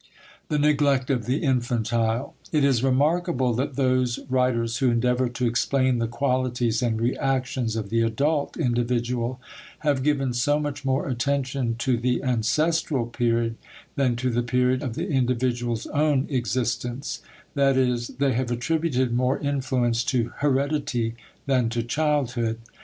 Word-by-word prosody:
*The 150 - +1
Neglect 145 -3 +2
of 120 -4 -1
the 130 +6 0
Infantile.* 120 -2 0 0.2
It 150 -4 +2
is 130 -4 +3
remarkable 135 -1 +2
that 130 +3 -2
those 130 -3 +1
writers 120 -3 +1
who 130 -3 +3
endeavor 125 +1 +1
to 125 +1 -2
explain 130 +1 +1
the 115 - 0
qualities 125 -1 0
and 115 -3 0
reactions 125 -1 -1
of 105 -3 -4
the 115 0 +2
adult 140 +7 0
individual 120 -2 -1 0.4
have 145 -4 +1
given 135 -3 +1
so 145 +5 +2
much 145 -2 -4
more 135 0 0
attention 130 -1 -1
to 120 +1 0
the 125 +2 0
ancestral 135 +3 +1
period 115 -1 0 0.4
than 130 -3 +1
to 125 +1 -1
the 120 +1 +1
period 125 +1 +1
of 125 -6 -4
the - - -3
individual's 120 -3 0
own 145 -2 +1
existence 120 +1 -2 0.3
that 140 -2 +3
is, 125 -2 +1
they 140 -1 0
have 125 +1 -1
attributed 130 0 0
more 125 +2 +1
influence 130 -4 0
to 120 -3 0
heredity 140 -4 0 0.3
than 130 -4 +2
to 115 0 -2
childhood. 125 -4 0
125 Hz, 140 wpm, -25 LUFS, 120-140 Hz, 0.4 s, is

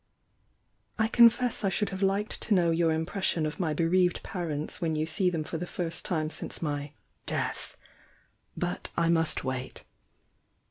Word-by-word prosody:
I 220 -1 +2
confess 235 0 +4
I 195 - +3
should 210 +2 0
have 190 0 -5
liked 200 +2 0
to 215 - +2
know 170 -2 +3
your 165 0 +2
impres 160 +5 -2
sion 165 -4 +2
of 155 - -4
my 160 -4 0
bereaved 175 +2 +2
parents 160 -5 -4
when 160 -2 0
you 155 0 0
see 175 +4 +1
them 165 -3 -2
for 160 +1 -5
the 180 - -4
first 170 -2 -4
time 155 -4 -1
since - - -5
my 145 -2 -3 0.3
'death!'— - - -3 0.8
but - - -3
I 170 -1 +3
must 165 -1 +2
wait. 130 -1 -4
170 Hz, 170 wpm, -29 LUFS, 155-190 Hz, 0.8 s, confess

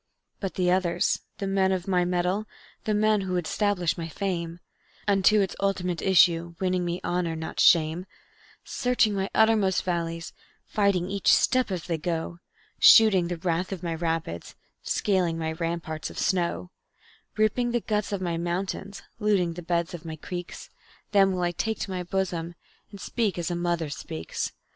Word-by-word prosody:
"But 195 -2 -4
the 180 -1 +2
others, 180 -2 +1 0.2
the 200 - -3
men 195 -1 +2
of 185 -1 -2
my 180 -2 +2
mettle, 180 +4 0 0.4
the 215 - +1
men 215 0 +3
who 190 -1 -3
would 175 -2 -1
'stablish 185 -2 0
my 165 - -4
fame 170 -1 -3 0.5
Unto 200 +1 +4
its 195 - -1
ultimate 185 -3 -1
issue, 170 -3 +4
winning 185 -1 0
me 175 0 -2
honor, 175 -2 -1
not 160 0 -6
shame; 165 +2 +4 0.6
Searching 245 -4 +1
my 195 0 -1
uttermost 220 -4 +3
valleys, 165 -2 -3 0.3
fighting 200 -4 +1
each 200 0 +2
step 255 -2 +3
as 180 -4 -3
they 165 -2 -2
go, 170 +1 -3 0.4
Shooting 200 -6 +7
the 175 0 -3
wrath 175 +2 -1
of 185 -2 -5
my 170 -1 -2
rapids, 165 - -3 0.3
scaling 180 -5 0
my 160 -1 -2
ramparts 165 -1 -4
of - - -12
snow; 180 -1 -1 0.7
Ripping 215 +3 +2
the 240 0 +1
guts 210 -1 -1
of 200 -2 -2
my 170 -2 -1
mountains, 190 +3 -3 0.2
looting 200 -6 +2
the 175 - -7
beds 170 0 -1
of 170 - -7
my 160 -2 -6
creeks, 175 +3 -7 0.4
Them 195 -2 +5
will 180 -1 -1
I 175 - +1
take 220 +5 -2
to 195 - -3
my 185 -1 -2
bosom, 175 -2 -2 0.3
and 200 - -11
speak 215 -6 -1
as 175 0 -2
a - - -1
mother 170 -3 -1
speaks. 80 - -5
180 Hz, 170 wpm, -26 LUFS, 170-195 Hz, 0.7 s, Shooting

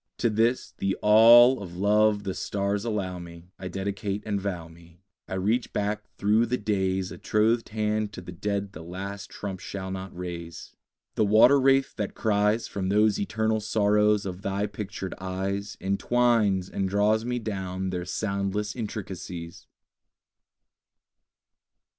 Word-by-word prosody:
To 120 - +1
this, 115 +4 +1
the 95 0 0
all 120 +3 +8
of 90 -3 -8
love 105 +1 +3
the 95 -2 -3
stars 100 +1 -2
allow 95 -5 -2
me, 85 0 -12
I 95 - -5
dedicate 100 +2 -3
and 100 -2 -1
vow 90 -4 -4
me. 85 +2 -18 0.2
I - - -4
reach 110 +6 0
back 105 +1 -1 0.2
through 110 +3 +3
the 125 +2 0
days 95 -3 -1
A - - -9
trothed 110 +2 +1
hand 105 -1 -1
to 90 - -7
the 90 - -9
dead 100 +2 -3
the 80 - -9
last 95 +4 -7
trump 95 -3 -6
shall 95 0 -6
not 95 -1 -6
raise. 85 -2 -7 0.4
The - - +1
water 110 +7 +6
wraith 135 0 +3
that 105 -3 -3
cries 105 +1 +1
From 95 -2 -3
those 105 +1 +3
eternal 110 +1 0
sorrows 105 -1 +2
of 95 -1 -5
thy 100 0 -1
pictured 100 -2 -6
eyes 100 +2 -3
Entwines 100 -1 +2
and 95 -1 -2
draws 105 +2 +2
me 125 +1 -2
down 95 -4 -3
their 90 -1 -3
soundless 100 +2 -2
intricacies! 95 -6 -6
100 Hz, 145 wpm, -26 LUFS, 95-110 Hz, 0.4 s, all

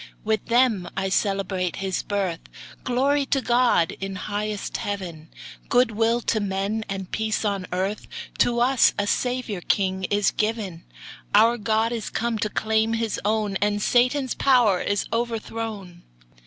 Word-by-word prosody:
With 220 0 -1
them 235 -6 +2
I 195 0 0
celebrate 190 -2 0
His 190 -1 -2
birth 195 -5 -2 0.4
Glory 275 +3 +2
to 275 - +2
God, 240 -9 +3
in 195 0 -4
highest 205 +2 -3
Heaven, 175 -6 -5 0.4
Good 245 -1 +4
will 225 +2 +1
to 220 - 0
men, 200 +2 -2
and 195 -2 -5
peace 220 0 -1
on 200 -3 -1
earth, 190 +3 -2 0.3
To 240 0 +3
us 255 0 +4
a 205 - 0
Saviour 245 -3 -1
king 190 0 0
is 205 +1 +2
given; 210 -6 -2 0.5
Our 235 +1 +5
God 220 +2 +1
is 230 -2 -3
come 230 -1 -2
to 210 - -1
claim 220 +1 +1
His 225 -2 -2
own, 210 -1 0
And 205 +1 0
Satan's 255 +4 +2
power 240 -9 +3
is 205 0 0
overthrown! 225 -5 -4
215 Hz, 145 wpm, -24 LUFS, 195-230 Hz, 0.5 s, Our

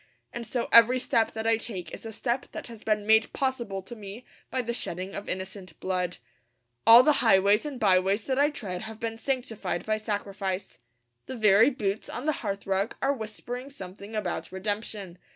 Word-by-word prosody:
And 235 -1 -5
so 240 +1 -2
every 235 +2 +8
step 230 -3 +1
that 220 0 -4
I 225 0 +4
take 205 -6 -6
is - - -7
a - - -6
step 240 +3 -2
that - - -6
has 230 -3 -10
been 210 -1 0
made 220 +1 +4
possible 235 -8 -2
to 240 - -9
me 210 +3 -9 0.2
by 255 -1 -1
the 235 0 -2
shedding 185 -5 -3
of 200 - -6
innocent 190 -2 -6
blood. 180 -2 -1 0.7
All 235 +2 +10
the 300 +2 +4
highways 205 +3 +4
and 275 -4 -6
byways 195 +1 +3
that 265 +2 -1
I 290 +1 +5
tread 195 -11 -5
have 220 0 -8
been 225 -1 -4
sanctified 225 -9 -2
by 215 0 +1
sacrifice. 200 -3 -4 0.5
The 260 - -5
very 215 +1 +6
boots 215 -6 -3
on 245 - -5
the 310 - +3
hearthrug 200 0 -1
are 275 +1 +2
whispering 245 +2 -6
something 200 -3 -9
about 195 -5 -3
redemption. 200 -1 -4
215 Hz, 185 wpm, -27 LUFS, 195-235 Hz, 0.7 s, All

